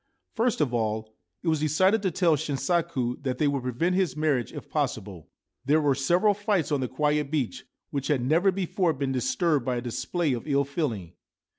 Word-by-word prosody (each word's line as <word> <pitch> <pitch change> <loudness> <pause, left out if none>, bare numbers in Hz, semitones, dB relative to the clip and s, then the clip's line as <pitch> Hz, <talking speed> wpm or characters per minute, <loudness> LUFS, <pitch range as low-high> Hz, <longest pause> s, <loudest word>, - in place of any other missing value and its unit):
First 230 -5 +1
of 130 -5 +1
all, 110 -1 -1 0.3
it - - -5
was 160 -2 +2
decided 185 +8 +3
to 195 - +1
tell 170 -2 +3
Shinsaku 140 -2 -1
that 130 -2 -2
they 150 - +2
would 140 -2 0
prevent 130 +9 0
his 185 -4 0
marriage 145 -7 +1
if - - -8
possible. 95 -5 -3 0.3
There 145 +4 +3
were 145 -2 +3
several 175 +10 +3
fights 200 -6 0
on 145 - +2
the 130 - -1
quiet 150 +2 0
beach, 145 -6 -2 0.3
which 140 -1 -2
had 140 -5 +1
never 165 +9 +3
before 180 -2 0
been 135 -1 -2
disturbed 160 - +1
by 125 0 -1
a 120 - -2
display 145 +6 -1
of 120 +4 -5
ill 140 -1 +2
feeling. 120 - -3
145 Hz, 190 wpm, -27 LUFS, 130-170 Hz, 0.3 s, decided